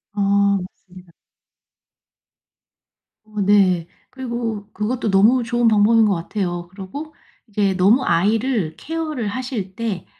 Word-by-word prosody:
아 200 0 +2
맞습니다. 180 -1 -14 2.1
어 215 -1 -8
네. 190 -4 +3 0.2
그리고 235 -5 -4
그것도 225 +1 -2
너무 215 +6 +4
좋은 240 +1 +1
방법인 220 +1 +4
것 205 - +2
같아요. 175 0 -3
그리고 210 - -8 0.3
이게 200 -2 0
너무 200 +8 +3
아이를 205 0 +1
케어를 310 -7 -4
하실 210 -4 -4
때 215 -6 -3
205 Hz, 235 characters per minute, -20 LUFS, 190-235 Hz, 2.1 s, 너무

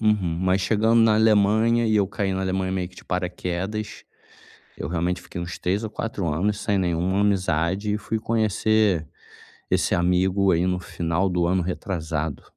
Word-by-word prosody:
Uhum. 100 -7 +1
Mas, 95 +1 +2
chegando 110 +4 +3
na 115 -1 +5
Alemanha 110 +2 +3
e 110 -1 +2
eu 100 -2 +3
caí 100 -1 -2
na 95 - -2
Alemanha 95 0 -1
meio 90 -2 -2
que 90 - -22
de - - -13
paraquedas. 90 +3 -4 0.7
Eu 70 - -4
realmente 90 +2 -1
fiquei 85 - -8
uns 85 +2 -5
3 95 +5 -1
ou 110 - -3
4 105 -5 -4
anos 100 +7 0
sem 100 -2 0
nenhuma 90 +2 0
amizade 95 0 0
e - - 0
fui 110 +1 -3
conhecer 110 -5 +1 0.6
esse - - +1
amigo 95 +2 +2
aí 85 +1 +2
no 90 0 0
final 90 +1 -1
do 90 -1 +1
ano 90 +1 +1
retrasado. 80 - -3
95 Hz, 170 wpm, -24 LUFS, 90-105 Hz, 0.7 s, na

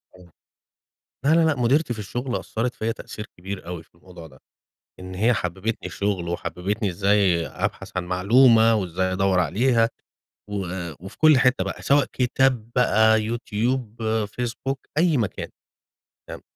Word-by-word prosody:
آه. 90 -2 -17 0.9
لا 155 - +4
لا 165 0 +4
لأ، 160 -2 +3
مُديرتي 130 +3 +1
في - - -11
الشغل 120 +5 -3
أثّرت 120 +3 -3
فيّا 110 +1 -2
تأثير 105 -1 -9
كبير 95 0 -7
أوي 90 -2 -6
في 80 - -31
الموضوع 85 -1 -13
ده، 65 -4 -17 0.6
إن 95 0 -8
هي 110 +6 +3
حبّبتني 95 +3 -3
الشُغل، 100 -4 -2
وحبّبتني 100 +4 -2
إزاي 95 -2 +2
أبحث - - -4
عن 90 - -1
معلومة، 115 +5 +5
وإزاي 95 -1 -1
أدوّر 95 -1 +2
عليها 115 - +2 0.6
و - - -7 0.5
وفي 95 +1 -11
كل 155 -3 +6
حتة 125 0 +3
بقى، - - -6
سواء 140 0 +3
كتاب 125 -2 +1
بقى، 110 -2 +4
يوتيوب، 115 +1 -2 0.3
فيسبوك، 125 +4 -4 0.2
أي 165 -2 +3
مكان، 110 -6 -3 0.8
تمام. - - -8
110 Hz, 145 wpm, -23 LUFS, 95-125 Hz, 0.9 s, كل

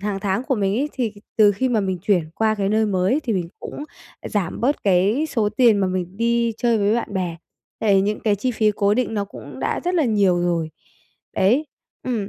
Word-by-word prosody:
hằng 200 -1 -3
tháng 195 +3 -1
của 265 - 0
mình 200 -3 0
ấy, 290 - -1
thì 240 -5 -2 0.2
từ 210 -2 +6
khi 255 +6 -1
mà 230 -4 +1
mình 190 -2 -2
chuyển 180 -6 +1
qua 220 -1 +1
cái 200 -2 -1
nơi 215 +1 +2
mới 195 +7 +1
thì 245 -6 -2
mình 180 -4 -2
cũng 290 - -7 0.5
giảm 200 -3 -2
bớt 275 +5 0
cái 200 - +2
số 215 -3 +1
tiền 220 -1 +4
mà 195 - +1
mình 185 0 -3
đi 235 +1 +1
chơi 235 -2 +2
với 205 +1 +2
bạn 235 -3 -3
bè. 180 -3 -2 0.4
Tại 200 -3 +3
những 210 +2 -1
cái 210 -2 +1
chi 250 +6 -1
phí 220 -2 +2
cố 200 0 +2
định 240 -1 -1
nó 205 -1 -1
cũng 140 -9 -11
đã - - -1
rất 360 +1 0
là 330 -4 +3
nhiều 200 -6 +2
rồi. 170 -2 -1 0.7
Đấy. 245 +11 +3 0.4
Ừm. 225 -6 -2
210 Hz, 225 wpm, -21 LUFS, 190-235 Hz, 0.7 s, từ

